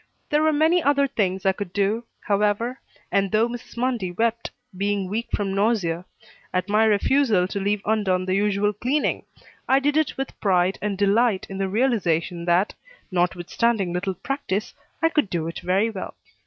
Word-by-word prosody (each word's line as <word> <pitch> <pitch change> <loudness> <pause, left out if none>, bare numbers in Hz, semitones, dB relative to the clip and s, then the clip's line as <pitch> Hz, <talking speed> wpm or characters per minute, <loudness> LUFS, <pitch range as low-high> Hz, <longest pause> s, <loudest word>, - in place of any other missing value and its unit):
There 300 +1 +3
were 315 0 +4
many 320 +4 +3
other 280 -1 +3
things 195 -8 -1
I 190 - +5
could 190 -2 -6
do, 210 +4 0 0.2
however, 210 +5 0 0.3
and 195 -1 +1
though 220 +2 +3
Mrs. 240 0 -9
Mundy 235 -7 -1
wept, 230 +4 -1 0.3
being 200 0 -1
weak 225 +5 -3
from 195 -2 -1
nausea, 195 -5 0 0.5
at 185 0 -1
my 210 +2 +3
refusal 215 -2 +3
to 200 - -4
leave 200 +1 -1
undone 195 -4 +1
the 185 - 0
usual 205 +1 +1
cleaning, 255 +8 -1 0.4
I 265 - +6
did 290 +2 +1
it 315 -2 0
with 270 0 -5
pride 185 -2 +2
and 205 -2 -2
delight 205 +1 +2
in 195 - -5
the 195 -1 0
realization 180 -7 0
that, 175 +4 +2 0.4
notwithstanding 180 +3 0
little 185 +1 -2
practice, 210 - -3 0.3
I 325 - +5
could 300 - +1
do 165 -3 -2
it 165 - -5
very 195 +5 +1
well. 195 -3 -6
205 Hz, 170 wpm, -24 LUFS, 185-235 Hz, 0.5 s, I